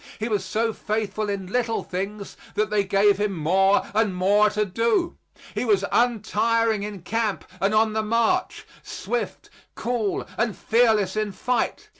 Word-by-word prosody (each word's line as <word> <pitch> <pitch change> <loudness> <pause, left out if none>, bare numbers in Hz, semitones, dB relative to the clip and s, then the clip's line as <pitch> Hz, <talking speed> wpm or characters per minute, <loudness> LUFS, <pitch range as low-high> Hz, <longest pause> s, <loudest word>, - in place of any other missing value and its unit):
He 220 - -3
was 210 -4 0
so 220 +4 -1
faithful 215 0 -2
in 200 -2 -3
little 235 -2 0
things 200 +2 -5 0.2
that 210 0 0
they 210 -1 +2
gave 200 +1 +3
him 205 -3 -1
more 190 +5 +3
and 210 -3 +1
more 205 +3 +4
to 210 0 0
do. 230 - 0 0.4
He - - -2
was 205 -5 +2
untiring 230 -1 +1
in 205 -3 -6
camp 220 0 -2 0.2
and 195 +1 +2
on 215 0 +3
the 220 - 0
march; 230 +12 0 0.2
swift, 485 - -5 0.2
cool 230 -4 -2
and 230 -3 0
fearless 220 -4 +2
in 215 -1 -1
fight. 245 +5 -2
210 Hz, 155 wpm, -24 LUFS, 200-230 Hz, 0.4 s, more